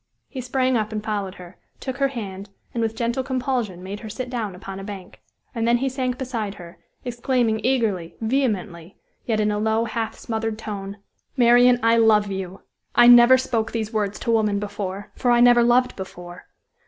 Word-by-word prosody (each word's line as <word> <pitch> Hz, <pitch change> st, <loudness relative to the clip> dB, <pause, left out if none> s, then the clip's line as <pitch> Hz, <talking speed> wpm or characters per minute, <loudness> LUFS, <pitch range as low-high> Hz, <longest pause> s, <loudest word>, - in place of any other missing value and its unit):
He 265 Hz, -, -6 dB
sprang 255 Hz, +1 st, 0 dB
up 215 Hz, 0 st, -2 dB
and 215 Hz, -1 st, -4 dB
followed 205 Hz, -3 st, -3 dB
her, 180 Hz, 0 st, -13 dB, 0.2 s
took 260 Hz, -1 st, -5 dB
her 275 Hz, 0 st, +2 dB
hand, 200 Hz, -6 st, -7 dB, 0.2 s
and, 235 Hz, -, -2 dB
with 225 Hz, 0 st, -1 dB
gentle 235 Hz, +3 st, -1 dB
compulsion, 250 Hz, -8 st, -2 dB
made 200 Hz, +2 st, -6 dB
her 220 Hz, -, -8 dB
sit 250 Hz, +4 st, -6 dB
down 220 Hz, -6 st, -3 dB
upon 195 Hz, +1 st, -8 dB
a -, -, -7 dB
bank; 195 Hz, -2 st, -9 dB, 0.3 s
and 230 Hz, -2 st, -1 dB
then 240 Hz, 0 st, +4 dB
he 265 Hz, +2 st, -1 dB
sank 255 Hz, -1 st, -2 dB
beside 230 Hz, -6 st, -4 dB
her, 175 Hz, -2 st, -12 dB, 0.3 s
exclaiming 240 Hz, -2 st, 0 dB
eagerly, 220 Hz, -10 st, 0 dB
vehemently, 210 Hz, -8 st, -2 dB, 0.3 s
yet 220 Hz, -3 st, +1 dB
in 210 Hz, 0 st, +1 dB
a 210 Hz, -, -1 dB
low, 220 Hz, +1 st, +1 dB
half 230 Hz, -1 st, -3 dB
smothered 225 Hz, -1 st, -3 dB
tone: 200 Hz, -2 st, -6 dB, 0.4 s
"Marian, 245 Hz, 0 st, +5 dB
I 230 Hz, 0 st, +4 dB
love 215 Hz, -3 st, +4 dB
you! 190 Hz, 0 st, -6 dB, 0.3 s
I 240 Hz, -, +7 dB
never 240 Hz, +1 st, +8 dB
spoke 230 Hz, -4 st, -2 dB
these 220 Hz, -1 st, -3 dB
words 205 Hz, -2 st, -1 dB
to 235 Hz, -, 0 dB
woman 215 Hz, -3 st, +2 dB
before, 200 Hz, -1 st, -5 dB
for 245 Hz, -, 0 dB
I 240 Hz, 0 st, +5 dB
never 240 Hz, 0 st, +6 dB
loved 245 Hz, +1 st, +3 dB
before. 180 Hz, -2 st, -9 dB
225 Hz, 190 wpm, -23 LUFS, 200-245 Hz, 0.4 s, never